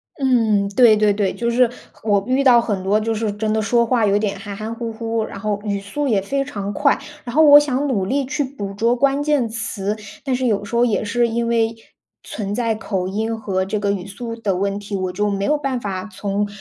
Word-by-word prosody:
嗯， 225 -7 +2
对 220 +2 +6
对 210 -1 +3
对。 200 -2 0
就 235 0 -2
是 245 0 +4 0.3
我 205 -2 +2
遇 260 +2 +2
到 250 -3 +7
很 205 -5 -2
多 200 +3 +2
就 225 +1 -1
是 220 -1 -1
真 215 +1 -2
的 220 - +1
说 235 +3 +2
话 235 -2 +2
有 200 0 +3
点 205 -2 -2
含 200 0 -7
含 215 +2 -5
糊 230 0 -5
糊， 225 0 -2
然 200 - -8
后 205 0 -2
语 200 -2 -2
速 210 +9 -3
也 210 -6 +2
非 275 +8 -1
常 205 -7 -5
快。 - - +2 0.3
然 240 0 -7
后 315 - +6
我 290 -1 +9
想 290 -1 -1
努 210 -9 0
力 275 +7 0
去 290 +2 -1
捕 230 -8 -6
捉 230 +4 +1
关 275 +3 +2
键 290 -5 +1
词， 215 -2 -2 0.3
但 265 -3 0
是 255 0 0
有 205 -3 0
时 235 - -5
候 240 +1 +4
也 225 -3 0
是 235 +3 +1
因 235 +1 -1
为， 230 -1 +1 0.5
存 205 -2 -5
在 230 -1 0
口 190 -4 -3
音 220 +4 -2
和 190 -3 -1
这 205 +3 -2
个 200 -1 0
语 190 -3 -3
速 230 +4 -6
的 210 -5 -1
问 200 +2 -1
题， 205 0 -6
我 185 -1 -2
就 210 +3 -1
没 200 0 -1
有 300 - +2
办 275 -3 -2
法 195 -4 -4
从， 200 +2 -2
220 Hz, 255 characters per minute, -20 LUFS, 200-245 Hz, 0.5 s, 我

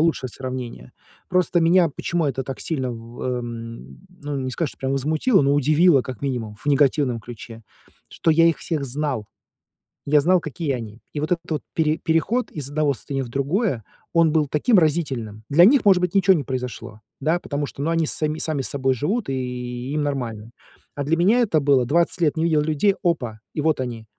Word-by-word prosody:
лучшее 160 -5 +1
сравнение. 125 - -7 0.4
Просто 180 -1 +2
меня 170 0 +4
почему 170 +3 -2
это 135 -1 -1
так 135 0 -7
сильно 130 -6 -2
в 115 +1 -9
м, 115 - -6
ну, 145 -1 -6
не 130 - -3
сказать, 150 +3 -2
что - - -16
прямо 135 0 -2
возмутило, 155 - +2
но 140 +1 +3
удивило, 150 +2 +4
как 130 0 -8
минимум, 120 -6 -3
в 145 - -18
негативном 140 -3 +2
ключе, 115 0 -10 0.5
что 165 - 0
я 165 +1 +5
их 165 - +3
всех 155 -5 -2
знал. 135 -4 -3 0.8
Я 150 +1 +4
знал, 175 +4 +3
какие 155 -1 -3
они. 115 -2 -7
И 150 - -3
вот 155 - -3
этот 170 -1 -1
вот 150 -4 -1
пере 155 -1 +1
переход 190 +10 0
из 140 -3 -5
одного 145 -1 +1
состояния 135 +2 -4
в 120 - -8
другое, 140 - -1 0.3
он 165 -2 +3
был 155 -3 +2
таким 210 +8 +3
разительным. 135 - 0
Для 160 +5 +6
них, 235 +3 +5
может 190 -3 +5
быть, 180 -1 0
ничего 195 -1 +5
не 145 - -1
произошло, 125 -4 -5 0.2
да 160 +4 +1
потому 145 -3 -3
что, 140 - -8
ну, 160 - 0
они 165 -1 +1
с - - -2
са 155 - -1
сами 155 -4 -1
собой 135 -1 0
живут, 190 - -1
и 125 0 -4
им 150 - 0
нормально. 120 -6 -3 0.4
А 140 -1 -4
для 160 +3 +2
меня 195 +8 +3
это 195 -11 +2
было- 135 -3 +3
20 170 +6 +1
лет 155 -1 +2
не 160 - 0
видел 160 -3 +3
людей 160 +6 +2
опа, 130 - -1
и 150 - -2
вот 155 -3 +1
они. 120 -3 -4
145 Hz, 200 wpm, -22 LUFS, 125-165 Hz, 0.8 s, Для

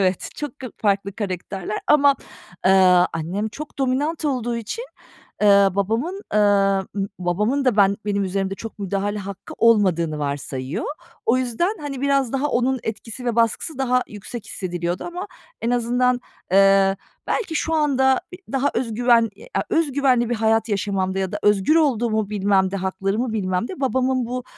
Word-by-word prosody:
evet, 185 -1 0
çok 295 -1 -6
k 260 - -6
farklı 200 -1 0
karakterler 195 0 -4
ama, 285 -1 +5 0.5
ııı, 185 -1 +6
annem 175 +6 -2
çok 295 +6 -9
dominant 285 +5 0
olduğu 240 -4 -1
için, 235 - -5 0.6
ııı, 200 -2 +5
babamın, 230 - -1
ııı, 195 -2 +3 0.3
babamın 210 +10 0
da 250 -5 +2
ben 200 -1 +4
benim 200 -1 0
üzerimde 195 +1 -2
çok 225 +2 -9
müdahale 200 +1 -2
hakkı 200 0 -8
olmadığını 180 -9 +3
varsayıyor. 140 -1 -3 0.4
O 235 +3 +4
yüzden, 255 - -1
hani, 280 -3 -5
biraz 275 -3 +1
daha 275 +2 0
onun 260 0 +1
etkisi 225 +3 -6
ve 235 -2 -1
baskısı 230 +6 0
daha 250 -1 +2
yüksek 215 +2 -8
hissediliyordu 175 -3 -3
ama 355 +3 -5 0.4
en 230 - 0
azından, 245 +1 +1 0.3
eee, 195 0 +5 0.3
belki 380 -8 -1
şu 320 +1 0
anda 265 -4 +3
e - - -7 0.2
daha 270 +1 +1
öz 230 -3 -1
güven, 235 -1 +4
e - - -14
a - - +1
öz 325 -4 +1
güvenli 255 -4 +2
bir 240 - +2
hayat 225 0 +1
yaşamamda 195 -2 -1
ya 190 -1 -2
da - - -2
özgür 205 +8 +3
olduğumu 230 -8 +1
bilmemde, 195 -2 +1
haklarımı 195 +5 -1
bilmemde 205 - -2
babamın 260 -1 +1
bu, 250 +1 -4
220 Hz, 155 wpm, -22 LUFS, 195-260 Hz, 0.6 s, ııı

